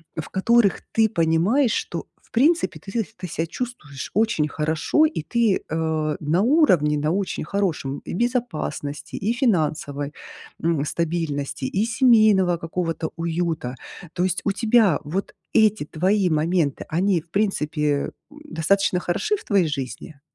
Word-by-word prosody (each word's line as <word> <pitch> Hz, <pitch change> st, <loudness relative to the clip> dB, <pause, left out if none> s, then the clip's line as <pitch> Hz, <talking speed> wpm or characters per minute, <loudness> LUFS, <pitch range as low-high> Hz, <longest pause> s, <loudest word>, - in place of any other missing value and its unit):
в 160 Hz, -, -4 dB
которых 215 Hz, +1 st, +3 dB
ты 225 Hz, -1 st, +3 dB
понимаешь, 185 Hz, -, +2 dB
что -, -, -3 dB
в -, -, -30 dB
принципе 310 Hz, +8 st, +2 dB
ты 195 Hz, -, -10 dB
сеc 225 Hz, -1 st, -1 dB
ты 180 Hz, -, -6 dB
себя 165 Hz, 0 st, -2 dB
чувствуешь 165 Hz, -, -6 dB
очень 205 Hz, -8 st, +2 dB
хорошо, 160 Hz, -, +1 dB
и 310 Hz, -, -1 dB
ты, 230 Hz, +2 st, +1 dB
э, 155 Hz, -1 st, -1 dB
на 155 Hz, +5 st, +1 dB
уровне, 185 Hz, -, +4 dB
на 150 Hz, +2 st, 0 dB
очень 195 Hz, +1 st, -2 dB
хорошем, 155 Hz, -6 st, -2 dB
и -, -, -5 dB
в -, -, -3 dB
безопасности, 185 Hz, -, -3 dB
и 215 Hz, +4 st, 0 dB
финансовой, 155 Hz, -, 0 dB, 0.5 s
м, 160 Hz, -3 st, +1 dB
стабильности, 155 Hz, -5 st, -2 dB
и 195 Hz, +10 st, 0 dB
семейного 215 Hz, -7 st, +4 dB
какого-то 165 Hz, -1 st, -3 dB
уюта. 165 Hz, -6 st, -2 dB, 0.4 s
То 180 Hz, -, -1 dB
есть 185 Hz, 0 st, 0 dB
у 200 Hz, -, +1 dB
тебя 220 Hz, -4 st, +3 dB
вот 175 Hz, +7 st, -4 dB, 0.2 s
эти 215 Hz, -5 st, +3 dB
твои 185 Hz, +5 st, +1 dB
моменты, 155 Hz, -2 st, 0 dB
они 180 Hz, +3 st, +1 dB
в 165 Hz, -, -30 dB
принципе, 170 Hz, -7 st, -1 dB, 0.5 s
м, 295 Hz, -, -14 dB
достаточно 195 Hz, -, +1 dB
хороши 420 Hz, -, 0 dB
в -, -, -9 dB
твоей 195 Hz, -5 st, +2 dB
жизни? 140 Hz, +1 st, -6 dB
175 Hz, 145 wpm, -23 LUFS, 155-215 Hz, 0.5 s, уровне